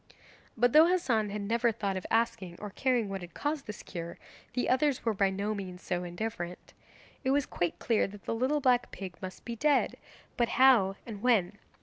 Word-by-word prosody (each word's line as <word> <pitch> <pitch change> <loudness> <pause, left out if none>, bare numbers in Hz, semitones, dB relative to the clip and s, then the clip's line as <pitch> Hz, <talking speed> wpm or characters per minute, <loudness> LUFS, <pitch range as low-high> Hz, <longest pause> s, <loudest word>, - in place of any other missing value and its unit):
But 245 +1 +3
though 315 +2 +8
Hassan 255 -12 +1 0.2
never 235 +2 +2
thought 200 -3 -2
of 185 - -4
asking 220 -6 0
or 210 -1 -6
caring 245 -1 +1
what 195 -1 -4
had 175 -1 -10
caused 295 -1 -2
his 210 - -7
cure, 170 -2 -7 0.4
the 250 - 0
others 260 0 +2
were 225 - +2
by 195 -1 +2
no 200 +3 -2
means 185 -3 -7
so 180 -1 -2
indifferent. 180 0 -5 0.5
It 260 - 0
was 280 0 +2
quite 175 -2 -2
clear 230 -3 +1
that 200 0 -12
the - - -1
little 260 +6 +1
black 250 -2 +3
pig 185 -3 -7
must 185 -1 -8
be 235 - -4
dead 290 +5 +2 0.4
but 235 -1 +2
how, 235 -7 +6
and 210 -4 -7
when? 210 -5 +2
220 Hz, 195 wpm, -30 LUFS, 190-250 Hz, 0.5 s, though